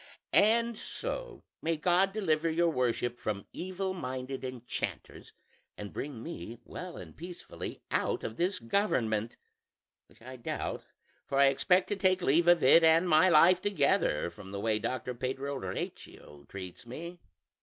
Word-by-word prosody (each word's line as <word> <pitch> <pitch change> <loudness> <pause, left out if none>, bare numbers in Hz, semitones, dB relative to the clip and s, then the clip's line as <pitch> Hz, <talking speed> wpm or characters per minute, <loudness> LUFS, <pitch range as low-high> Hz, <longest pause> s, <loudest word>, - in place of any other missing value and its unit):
And 230 +1 +4
so, - - -5 0.2
may 165 0 0
God 180 +4 +3
deliver 165 -6 +1
your 170 +1 +2
worship 120 -2 -1
from 100 -3 -3
evil 185 +1 -3
minded 130 -5 -5
enchanters, 125 -2 -5 0.5
and 105 -1 -7
bring 135 -5 -5
me 110 +8 -7
well 180 -1 -7
and - - -10
peacefully 175 +2 -8
out - - 0
of 110 - -4
this 180 +7 0
government; 115 - 0 0.7
which - - -23
I 130 +1 -9
doubt, 120 - -4 0.4
for 135 - -1
I 140 0 +7
expect 180 +7 +3
to 205 - 0
take 185 -2 +2
leave 165 +5 +3
of 175 -2 +6
it 165 +6 +7
and 165 +2 +5
my 175 +3 +6
life 175 +3 +6
together, 195 - +1
from 95 +3 -12
the 100 - -4
way 110 0 +1
Doctor 125 +3 -3
Pedro 135 +3 -3
Recio 75 - -7
treats 95 +3 -8
me. 170 +8 -7
150 Hz, 150 wpm, -31 LUFS, 120-180 Hz, 0.7 s, I